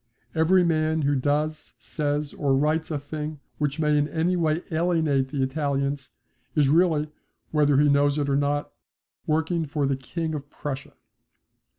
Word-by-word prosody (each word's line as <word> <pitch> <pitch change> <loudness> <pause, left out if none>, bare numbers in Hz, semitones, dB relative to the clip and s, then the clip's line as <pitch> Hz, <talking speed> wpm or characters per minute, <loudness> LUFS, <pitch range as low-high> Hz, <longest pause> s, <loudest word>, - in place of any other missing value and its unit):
Every 175 +3 +4
man 160 -2 +1
who 140 +1 +2
does, 150 +3 -1
says, 145 -1 -2
or 145 -9 +1
writes 155 +3 +1
a 155 - -1
thing 150 +1 -5 0.2
which 150 0 -1
may 150 -1 +2
in 145 0 +2
any 165 +4 0
way 160 -1 0
alienate 160 -5 +1
the 135 -1 -1
Italians 140 0 -1 0.5
is 145 -3 +4
really, 155 -2 +3 0.4
whether 145 -2 +3
he 150 - +5
knows 145 0 +3
it 145 -1 0
or 140 - +1
not, 145 +1 0 0.6
working 160 +1 0
for 145 0 -1
the 135 0 +1
King 160 +5 -4
of 145 -1 -6
Prussia. 140 -2 -6
150 Hz, 160 wpm, -25 LUFS, 145-160 Hz, 0.6 s, he